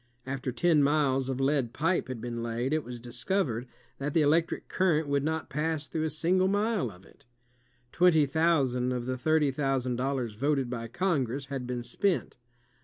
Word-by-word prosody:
After 135 0 -3
ten 160 +3 +3
miles 140 -2 +2
of 130 -1 -2
lead 135 -3 +1
pipe 165 +6 0
had 130 -3 -5
been 120 0 -4
laid, 120 +4 -2
it 155 -1 +1
was 120 0 -8
discovered 125 - -2 0.3
that 140 +1 -3
the 160 - +5
electric 160 +3 +1
current 160 -5 +1
would 140 0 +1
not 160 +1 -2
pass 155 +1 -2
through 160 -1 -2
a - - 0
single 180 +5 +2
mile 205 - +1
of 90 -1 -15
it. - - -21 0.7
Twenty 175 -4 +4
thousand 135 -5 +1
of 125 -1 -3
the 130 0 -2
thirty 150 +2 +2
thousand 130 -3 -1
dollars 130 -3 -1
voted 135 +2 0
by 115 -2 -4
Congress 140 -3 -1
had 130 -2 -3
been 125 -1 -3
spent. 180 +10 -1
140 Hz, 180 wpm, -29 LUFS, 125-160 Hz, 0.7 s, the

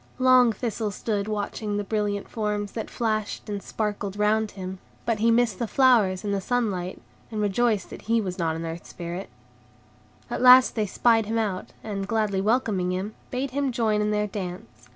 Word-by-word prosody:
Long 255 -2 +6
Thistle 220 0 -2
stood 205 0 -2
watching 210 0 -2
the 205 - -1
brilliant 205 -1 -1
forms 210 -2 -2
that 225 - -5
flashed 215 -3 -2
and 205 -1 -3
sparkled 205 -2 -3
round 215 +1 +2
him; 190 -1 -7 0.3
but 230 -2 0
he 230 +2 +3
missed 230 -4 +2
the 235 - -1
flowers 220 -8 +4
and 205 -1 -1
the 195 - 0
sunlight, 195 -6 -1 0.3
and 220 - -4
rejoiced 210 0 +1
that - - -8
he 230 0 +4
was 190 -3 -4
not 165 -2 0
an 165 +1 -4
Earth 165 +1 -6
Spirit. 175 +2 -6 1.0
At - - -3
last 255 0 +8
they 215 -2 0
spied 225 +1 +3
him 225 +1 -1
out, 205 -5 -2
and, 195 -3 -4
gladly 210 -3 0
welcoming 205 -4 +1
him, 190 +4 -3 0.2
bade 255 +1 -2
him 280 0 0
join 220 -3 +1
in 210 - +1
their 210 0 +1
dance. 175 - -7
210 Hz, 185 wpm, -25 LUFS, 195-230 Hz, 1.0 s, last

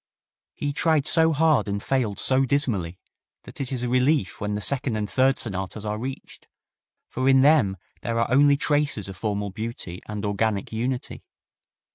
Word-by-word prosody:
He 145 0 -3
tried 155 -1 +2
so 160 0 +4
hard 155 -4 +2
and 100 0 -1
failed 120 -7 -1
so 130 0 +2
dismally 115 -11 0 0.5
that - - -9
it 135 - -4
is 125 -2 -3
a - - -1
relief 130 - +1
when 105 0 -2
the - - -2
second 130 +2 0
and 105 -1 -2
third 130 +6 +2
sonatas 100 -1 -3
are 105 0 -3
reached, 130 +3 -8 0.6
for 130 +1 -1
in 135 -1 +6
them 135 -10 +4 0.2
there 115 0 -2
are 115 - 0
only 140 +1 +5
traces 145 -8 0
of 95 - -8
formal 105 0 -3
beauty 110 -4 -6
and 105 0 -5
organic 100 0 -1
unity. 125 +3 -4
120 Hz, 170 wpm, -24 LUFS, 105-140 Hz, 0.6 s, in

